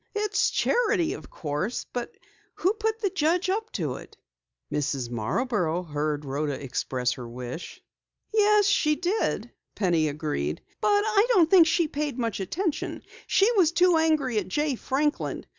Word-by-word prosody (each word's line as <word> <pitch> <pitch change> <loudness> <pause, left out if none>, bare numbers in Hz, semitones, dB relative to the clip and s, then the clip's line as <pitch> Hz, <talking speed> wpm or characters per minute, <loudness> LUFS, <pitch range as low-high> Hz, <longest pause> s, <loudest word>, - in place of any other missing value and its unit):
"It's 420 0 +1
charity, 415 -8 +1
of - - -10
course. 155 +10 -3
But 245 -1 -5 0.4
who 375 +4 +1
put 445 0 -2
the 395 -4 0
judge 355 +2 +1
up 445 +3 -2
to - - -2
it?" - - -13 0.6
"Mrs. 140 -4 -2
Marborough 175 - -1
heard 150 -2 -2
Rhoda 145 +2 -2
express 130 -2 -2
her 120 -2 -6
wish." 125 +7 -7 0.5
"Yes, 420 -1 +4
she 305 -6 +3
did," 360 +7 -1 0.2
Penny 170 -5 +2
agreed, 145 - -3 0.2
"but 410 -1 +3
I 435 0 +3
don't 335 -6 +4
think 350 -4 +7
she 330 +1 +2
paid 290 -3 -3
much 230 -4 -2
attention. 320 - -3 0.2
She 405 +4 +4
was 370 -9 +4
too 355 0 +4
angry 305 -8 +2
at 190 - -5
Jay 295 +9 0
Franklin. 285 +4 -1
290 Hz, 150 wpm, -26 LUFS, -, 0.6 s, think